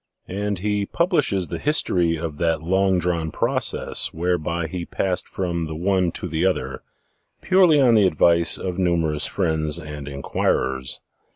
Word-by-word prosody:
And 100 +1 -3
he 105 +1 -1
publishes 150 - 0
the - - -4
history 90 - +1
of 75 -2 -6
that 80 -2 0
long 95 +2 +2
drawn 85 -2 -1
process - - 0
whereby 85 0 -2
he 85 +2 -5
passed 90 +1 -2
from 85 -3 -3
the 80 - -6
one 90 +1 +1
to - - -5
the 80 0 -2
other, 95 -1 -1 0.6
purely 180 -5 +4
on 125 -4 +5
the 105 -4 +5
advice 85 0 +3
of 90 -1 -4
numer 85 -4 +1
ous 75 - -1
friends 80 -4 0
and 75 -3 -8
inquirers. 65 -2 -2
85 Hz, 155 wpm, -22 LUFS, 80-95 Hz, 0.6 s, on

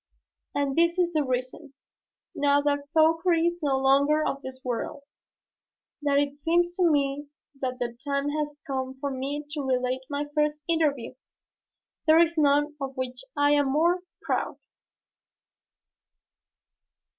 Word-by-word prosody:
And 280 -1 0
this 340 +1 +3
is 350 -1 +1
the 305 -2 +2
reason, 255 +2 -4 0.6
now 285 0 +3
that 285 0 -1
Fauchery 330 +1 +3
is 345 0 -1
no 280 -3 +1
longer 280 +3 +3
of 275 - -2
this 260 -1 -8
world, 255 +4 -4 1.0
that 285 -1 +2
it 285 0 0
seems 345 +3 +1
to 360 -2 +4
me 285 -1 0 0.3
that 255 -1 -2
the 240 -1 -3
time 280 0 -1
has 295 -1 -3
come 265 -2 -3
for 280 +1 -2
me 275 +3 -3
to 305 -2 -3
relate 255 -1 0
my 290 0 -2
first 300 0 0
interview. 295 -8 0 0.9
There 315 +1 +7
is 335 0 +3
none 295 -1 +2
of 270 -1 -5
which 255 -1 -4 0.2
I 290 0 +4
am 290 -1 +3
more 340 +5 +3 0.2
proud. - - -1
285 Hz, 140 wpm, -26 LUFS, 270-310 Hz, 1.0 s, There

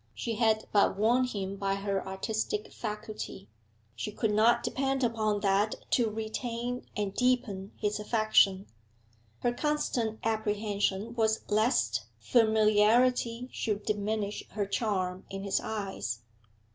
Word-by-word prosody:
She 230 -2 -3
had 220 -2 +2
but 200 -1 +3
won 240 +5 +3
him 200 -5 -4
by 195 0 0
her 195 -1 -2
artistic 220 - -2
faculty; 210 - -6 0.5
she 210 - -4
could 215 +1 0
not 220 +3 +4
depend 270 0 0
upon 215 -3 +1
that 200 +2 +2 0.2
to 235 -3 +3
retain 235 +3 -4
and 205 -2 -1
deepen 240 -6 0
his 210 -1 -1
affection. 210 -3 +3 0.8
Her 240 - +1
constant 245 -6 -1
apprehension 210 -1 -1
was 220 -2 +1
lest 115 - +2
familiarity 225 - +3
should 210 -2 -2
diminish 210 0 -1
her 205 -1 -1
charm 190 -3 -1
in 195 0 -5
his 200 -1 +1
eyes. 190 - -4
215 Hz, 120 wpm, -30 LUFS, 200-230 Hz, 0.8 s, not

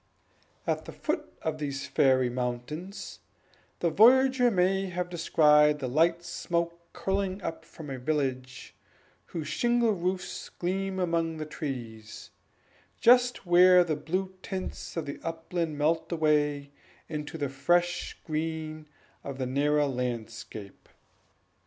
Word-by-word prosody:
At - - -1
the - - -8
foot - - -3
of 155 -1 -2
these 140 -2 -3
fairy 130 -2 +3
mountains, 125 - -5 0.6
the 170 - +2
voyager 250 +5 +6
may 190 -1 +2
have 180 0 -3
descried 150 -3 +4
the 135 -3 -4
light 165 +6 +2
smoke 170 0 -2
curling 195 0 -1
up 165 - -4
from 150 -4 -10
a 130 - -5
village, 130 -3 -2 0.5
whose 160 -3 -5
shingle 235 +8 +2
roofs 185 0 -3
gleam 190 +2 -2
among 165 -2 0
the 155 - -4
trees, 120 -8 -7 0.7
just 245 -2 +4
where 180 +1 +7
the 160 -3 -1
blue 185 +5 -3
tints 185 -2 -6
of 165 - -2
the 140 - -6
upland 165 -1 -3
melt 160 +3 +1
away 150 -3 +1 0.4
into 150 0 -5
the 145 -2 -1
fresh 175 +6 0
green 155 -1 -3 0.4
of 140 -1 -6
the 130 - -2
nearer 145 +3 +2
landscape. 120 -5 -5
160 Hz, 125 wpm, -28 LUFS, 140-180 Hz, 0.7 s, where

